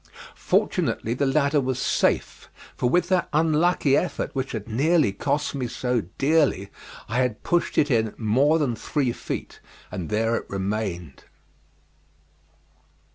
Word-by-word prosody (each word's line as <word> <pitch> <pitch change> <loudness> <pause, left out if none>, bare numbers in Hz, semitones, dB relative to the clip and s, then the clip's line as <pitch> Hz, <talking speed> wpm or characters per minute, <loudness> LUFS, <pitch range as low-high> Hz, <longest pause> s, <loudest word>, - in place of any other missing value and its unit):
Fortunately 115 - 0
the 135 +3 0
ladder 140 +1 +2
was 130 -1 -2
safe, - - 0 0.3
for 125 - 0
with 175 +7 +2
that 185 -2 +1
unlucky 155 -1 +3
effort 180 - -1
which 135 0 -3
had 110 -2 -5
nearly 145 - +2
cost 145 +8 -1
me 130 -3 -2
so 125 0 -1 0.2
dearly 140 -9 +2 0.4
I 110 - -2
had 125 -4 0
pushed 175 0 0
it 145 -1 +3
in 110 -3 +1
more 130 +8 +3
than 140 -7 0
three 130 +3 -1
feet, - - -6 0.3
and 90 -3 -5
there 115 +2 +1
it - - -7
remained. 95 - -4
130 Hz, 135 wpm, -24 LUFS, 110-150 Hz, 0.4 s, unlucky